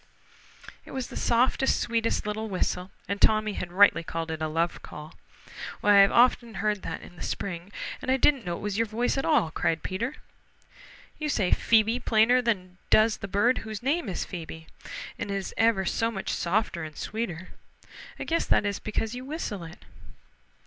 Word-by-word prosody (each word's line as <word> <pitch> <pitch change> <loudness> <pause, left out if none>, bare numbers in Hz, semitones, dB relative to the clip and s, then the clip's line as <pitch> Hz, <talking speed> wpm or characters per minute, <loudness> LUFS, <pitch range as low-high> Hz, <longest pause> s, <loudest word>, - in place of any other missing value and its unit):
It - - -12
was 260 -2 -3
the - - -9
softest, 250 +3 +2
sweetest 230 -2 0
little 215 +1 -3
whistle, 185 -1 -2 0.2
and 200 0 -3
Tommy 215 -1 +4
had 175 -2 -5
rightly 190 -3 +5
called 165 0 -4
it 160 0 -5
a 155 - 0
love 165 +2 -1
call. 150 +2 -10 0.7
"Why, 205 -1 +7
I've 195 - +3
often 235 -1 +3
heard 210 -1 0
that - - -5
in 175 - -13
the - - -11
spring 180 0 -4 0.3
and - - -5
didn't 275 -4 +3
know 175 -2 -3
it - - -10
was 205 0 -2
your 230 - +2
voice 230 +3 0
at - - -2
all," 290 - +3
cried 160 0 0
Peter. 235 +10 -3 1.0
"You 305 -1 -2
say 200 -10 +1
Phoebe 225 +1 +3
plainer 235 +2 +4
than 185 -6 -2
does 215 0 +4
the 195 - -6
bird 205 +6 +2
who 220 - -9
is 215 +1 -6
named 270 - 0
Phoebe, 160 -2 -6 0.5
and - - -4
it 200 - -1
is 195 -1 -4
ever 225 -4 +3
so 225 +5 +1
much 195 -4 -4
softer 175 0 0
and 155 -1 -8
sweeter. 185 -6 -4 0.7
I - - -4
guess 330 0 0
that - - +3
is 200 -1 -1
because 220 +1 -3
you 250 +1 -6
whistle 270 - -4
it." 165 - -13
210 Hz, 185 wpm, -27 LUFS, 180-230 Hz, 1.0 s, Why